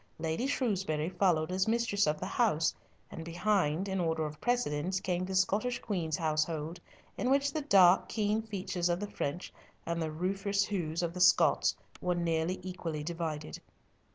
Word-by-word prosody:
Lady 160 Hz, +10 st, -1 dB
Shrewsbury 190 Hz, -, 0 dB
followed 180 Hz, -3 st, +1 dB
as 185 Hz, +2 st, +1 dB
mistress 220 Hz, -5 st, +1 dB
of 150 Hz, 0 st, 0 dB
the -, -, -4 dB
house, 200 Hz, -10 st, +1 dB, 0.4 s
and 165 Hz, -, -7 dB
behind, 175 Hz, 0 st, 0 dB
in 190 Hz, -1 st, -1 dB
order 160 Hz, -2 st, 0 dB
of 150 Hz, 0 st, -7 dB
precedence, 185 Hz, -7 st, 0 dB
came 180 Hz, -1 st, -1 dB
the 190 Hz, 0 st, -4 dB
Scottish 205 Hz, +6 st, +1 dB
Queen's 170 Hz, -7 st, -2 dB
household, 155 Hz, +1 st, -1 dB, 0.4 s
in 250 Hz, -, 0 dB
which 280 Hz, +1 st, +2 dB
the 310 Hz, -, -1 dB
dark, 190 Hz, -9 st, +5 dB
keen 215 Hz, 0 st, 0 dB
features 185 Hz, -5 st, -2 dB
of 175 Hz, 0 st, +1 dB
the 205 Hz, 0 st, -5 dB
French, 145 Hz, +5 st, -4 dB, 0.3 s
and 170 Hz, 0 st, -2 dB
the 160 Hz, -, -1 dB
rufous 195 Hz, +4 st, 0 dB
hues 170 Hz, -4 st, -2 dB
of 170 Hz, -1 st, -2 dB
the 180 Hz, -, -4 dB
Scots, 180 Hz, -, +5 dB, 0.3 s
were 180 Hz, 0 st, 0 dB
nearly 170 Hz, +1 st, 0 dB
equally 170 Hz, -5 st, -4 dB
divided. 160 Hz, -, -4 dB
180 Hz, 165 wpm, -31 LUFS, 160-200 Hz, 0.4 s, dark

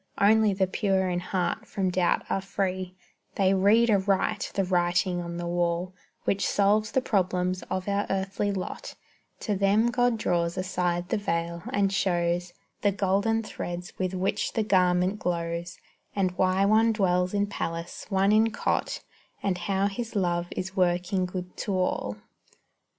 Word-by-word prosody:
Only 215 Hz, +1 st, +5 dB
the 190 Hz, 0 st, +1 dB
pure 190 Hz, 0 st, 0 dB
in 175 Hz, 0 st, 0 dB
heart 180 Hz, 0 st, -2 dB
from 190 Hz, -2 st, -1 dB
doubt 180 Hz, -1 st, +1 dB
are 195 Hz, -, -1 dB
free; 185 Hz, -1 st, -3 dB, 0.4 s
They 195 Hz, -1 st, +3 dB
read 215 Hz, +5 st, +4 dB
aright 200 Hz, +1 st, +1 dB
the 195 Hz, -, +2 dB
writing 180 Hz, 0 st, +1 dB
on 170 Hz, 0 st, -5 dB
the 175 Hz, -, -4 dB
wall 175 Hz, +1 st, -1 dB, 0.3 s
Which 200 Hz, -1 st, 0 dB
solves 210 Hz, +2 st, +2 dB
the 260 Hz, -, +3 dB
problems 185 Hz, -4 st, 0 dB
of 185 Hz, +1 st, -3 dB
our 200 Hz, 0 st, 0 dB
earthly 195 Hz, +1 st, -1 dB
lot; 190 Hz, -2 st, -5 dB, 0.5 s
To 210 Hz, -, -1 dB
them 200 Hz, +4 st, +3 dB
God 245 Hz, -1 st, +2 dB
draws 170 Hz, -3 st, 0 dB
aside 180 Hz, -1 st, -1 dB
the 225 Hz, -, 0 dB
veil, 170 Hz, -3 st, -2 dB
and 200 Hz, -1 st, +1 dB
shows 175 Hz, -2 st, 0 dB, 0.3 s
The 205 Hz, -, +3 dB
golden 200 Hz, +4 st, +1 dB
threads 175 Hz, -4 st, -6 dB
with 185 Hz, 0 st, -1 dB
which 185 Hz, +1 st, -1 dB
the 225 Hz, -, +1 dB
garment 185 Hz, 0 st, +2 dB
glows, 170 Hz, 0 st, -3 dB, 0.4 s
And 190 Hz, -2 st, +1 dB
why 185 Hz, +1 st, +2 dB
one 220 Hz, +2 st, +4 dB
dwells 180 Hz, -2 st, +1 dB
in 200 Hz, 0 st, +2 dB
palace, 170 Hz, -4 st, -5 dB
one 195 Hz, 0 st, +3 dB
in 220 Hz, +1 st, +4 dB
cot, 215 Hz, -, -1 dB, 0.4 s
And 195 Hz, -2 st, +1 dB
how 190 Hz, +2 st, 0 dB
His 225 Hz, +3 st, -3 dB
love 175 Hz, -3 st, 0 dB
is 190 Hz, +1 st, -5 dB
working 180 Hz, +1 st, +1 dB
good 180 Hz, 0 st, -6 dB
to 200 Hz, -, -2 dB
all. 105 Hz, -, -1 dB
190 Hz, 155 wpm, -27 LUFS, 180-200 Hz, 0.5 s, Only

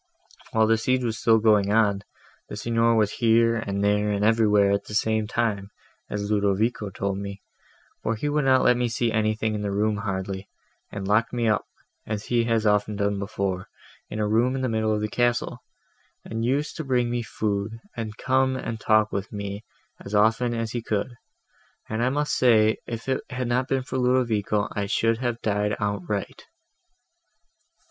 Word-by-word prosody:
While 110 Hz, 0 st, +3 dB
the 110 Hz, 0 st, +3 dB
siege 130 Hz, +2 st, +1 dB
was 115 Hz, 0 st, -3 dB
going 110 Hz, -3 st, +4 dB
on, 105 Hz, -2 st, +3 dB, 0.5 s
the -, -, -6 dB
Signor 115 Hz, +1 st, +2 dB
was 105 Hz, -2 st, +2 dB
here, 115 Hz, 0 st, +3 dB
and 100 Hz, -3 st, -2 dB
there, 105 Hz, +1 st, +2 dB
and 105 Hz, 0 st, 0 dB
everywhere, 105 Hz, -3 st, +4 dB
at 100 Hz, -, 0 dB
the 105 Hz, -, -7 dB
same 110 Hz, 0 st, +1 dB
time, 105 Hz, -4 st, -1 dB, 0.4 s
as 105 Hz, 0 st, -3 dB
Ludovico 105 Hz, +1 st, +1 dB
told 100 Hz, 0 st, -3 dB
me, 100 Hz, 0 st, -7 dB, 0.6 s
for 115 Hz, -, -1 dB
he 130 Hz, +7 st, -3 dB
would 145 Hz, -1 st, +1 dB
not 130 Hz, -1 st, +4 dB
let 125 Hz, -1 st, +4 dB
me 125 Hz, 0 st, +1 dB
see 115 Hz, 0 st, 0 dB
anything 110 Hz, 0 st, 0 dB, 0.4 s
hardly, 95 Hz, -1 st, -4 dB, 0.4 s
and 100 Hz, -1 st, -5 dB
locked 110 Hz, +4 st, +2 dB
me 120 Hz, -2 st, 0 dB
up, 105 Hz, -1 st, +1 dB, 0.4 s
as 105 Hz, -1 st, -3 dB
he 120 Hz, -1 st, +1 dB
has 115 Hz, -1 st, +1 dB
often 105 Hz, 0 st, +2 dB
done 100 Hz, 0 st, 0 dB
before, 100 Hz, -2 st, -3 dB, 0.4 s
in -, -, -5 dB
a 105 Hz, -1 st, 0 dB
room 120 Hz, +5 st, +2 dB
in 130 Hz, -, -2 dB
the 130 Hz, -, 0 dB
middle 110 Hz, -1 st, 0 dB
of 105 Hz, -1 st, 0 dB
the 105 Hz, -, 0 dB
castle, 120 Hz, +2 st, 0 dB, 0.7 s
and 110 Hz, +1 st, -4 dB
used 140 Hz, +5 st, 0 dB
to 160 Hz, -, -3 dB
bring 125 Hz, -3 st, +1 dB
me 120 Hz, 0 st, -1 dB
food, 110 Hz, 0 st, -3 dB, 0.2 s
and 110 Hz, -2 st, -5 dB
come 130 Hz, 0 st, +1 dB
and 115 Hz, -3 st, -4 dB
talk 110 Hz, 0 st, +3 dB
with 100 Hz, +1 st, -4 dB
me 100 Hz, 0 st, -5 dB, 0.4 s
as 100 Hz, -, -4 dB
often 110 Hz, +4 st, +3 dB
as 115 Hz, -1 st, -2 dB
he 120 Hz, -, -3 dB
could; 110 Hz, +2 st, -2 dB, 0.7 s
and 110 Hz, +1 st, -2 dB
I 125 Hz, -, +3 dB
must 145 Hz, +2 st, 0 dB
say, 110 Hz, -3 st, +4 dB
if 115 Hz, +1 st, -6 dB
it 130 Hz, -1 st, 0 dB
had 125 Hz, -1 st, -3 dB
not 125 Hz, +2 st, 0 dB
been 135 Hz, -1 st, 0 dB
for 130 Hz, 0 st, -3 dB
Ludovico, 115 Hz, -5 st, +1 dB
I 100 Hz, -1 st, -2 dB
should 115 Hz, +2 st, +1 dB
have 120 Hz, -2 st, -3 dB
died 105 Hz, 0 st, 0 dB
outright." 100 Hz, -1 st, -3 dB
110 Hz, 180 wpm, -25 LUFS, 105-120 Hz, 0.7 s, going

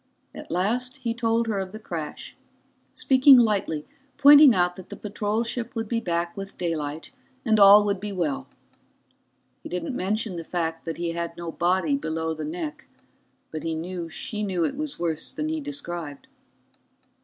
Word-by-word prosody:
At -, -, -10 dB
last 235 Hz, +9 st, -1 dB
he 240 Hz, -3 st, -2 dB
told 230 Hz, 0 st, +1 dB
her 215 Hz, -3 st, -1 dB
of 190 Hz, 0 st, -5 dB
the -, -, -6 dB
crash, 165 Hz, -8 st, -6 dB, 0.6 s
speaking 265 Hz, 0 st, +6 dB
lightly, 200 Hz, -10 st, +1 dB, 0.3 s
pointing 285 Hz, -3 st, +8 dB
out 180 Hz, -1 st, +2 dB
that 185 Hz, -1 st, -12 dB
the -, -, -7 dB
patrol 210 Hz, +2 st, -2 dB
ship 235 Hz, +1 st, -5 dB
would 225 Hz, -1 st, -2 dB
be 230 Hz, +1 st, 0 dB
back 170 Hz, -4 st, -2 dB
with 195 Hz, 0 st, -8 dB
daylight 160 Hz, -3 st, -3 dB, 0.3 s
and 220 Hz, -2 st, +3 dB
all 200 Hz, +1 st, +9 dB
would 200 Hz, -2 st, -1 dB
be 205 Hz, +1 st, -5 dB
well. 170 Hz, -8 st, -2 dB, 1.1 s
He -, -, -9 dB
didn't 180 Hz, +9 st, -3 dB
mention 205 Hz, -1 st, -2 dB
the 165 Hz, -, -5 dB
fact 165 Hz, -1 st, -3 dB
that 165 Hz, -1 st, -4 dB
he 170 Hz, 0 st, -2 dB
had 170 Hz, 0 st, -4 dB
no 170 Hz, -1 st, -5 dB
body 175 Hz, -3 st, +1 dB
below 160 Hz, +2 st, -2 dB
the 155 Hz, -1 st, -5 dB
neck, 155 Hz, -1 st, -5 dB, 0.7 s
but 155 Hz, -, -5 dB
he 165 Hz, -1 st, -2 dB
knew 170 Hz, +1 st, -5 dB
she 210 Hz, +6 st, -5 dB
knew 185 Hz, -5 st, 0 dB
it 275 Hz, -, -2 dB
was 300 Hz, 0 st, -4 dB
worse 165 Hz, -2 st, -3 dB
than 305 Hz, +1 st, -3 dB
he 320 Hz, 0 st, -2 dB
described. 175 Hz, -, -6 dB
185 Hz, 175 wpm, -25 LUFS, 165-225 Hz, 1.1 s, all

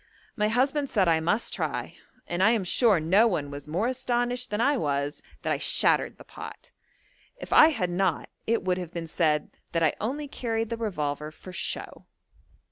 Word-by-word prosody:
My 210 Hz, -1 st, +1 dB
husband 270 Hz, +5 st, +1 dB
said 195 Hz, -5 st, +2 dB
I 165 Hz, -1 st, +4 dB
must 190 Hz, +8 st, 0 dB
try, 155 Hz, -, -3 dB, 0.3 s
and 175 Hz, +1 st, -2 dB
I 200 Hz, -, +6 dB
am 220 Hz, -4 st, 0 dB
sure 205 Hz, +1 st, +3 dB
no 190 Hz, +9 st, +4 dB
one 150 Hz, -9 st, -2 dB
was 145 Hz, +1 st, -8 dB
more 175 Hz, +8 st, -1 dB
astonished 245 Hz, 0 st, -1 dB
than 210 Hz, -, -2 dB
I 285 Hz, +5 st, +3 dB
was 145 Hz, -, -1 dB, 0.2 s
that -, -, +1 dB
I -, -, -2 dB
shattered -, -, +3 dB
the -, -, -12 dB
pot. -, -, -10 dB, 0.7 s
If -, -, -5 dB
I -, -, +9 dB
had 185 Hz, -, -1 dB
not 180 Hz, -3 st, 0 dB, 0.2 s
it 230 Hz, +1 st, +1 dB
would 185 Hz, 0 st, 0 dB
have 175 Hz, -2 st, -6 dB
been 170 Hz, -1 st, -5 dB
said 155 Hz, -2 st, 0 dB, 0.2 s
that 165 Hz, -1 st, +1 dB
I 155 Hz, -, +3 dB
only 285 Hz, +7 st, -2 dB
carried 225 Hz, -4 st, -3 dB
the 230 Hz, -, -2 dB
revolver 150 Hz, -9 st, -3 dB
for 180 Hz, +4 st, -12 dB
show. -, -, -5 dB
190 Hz, 190 wpm, -27 LUFS, 160-235 Hz, 0.7 s, I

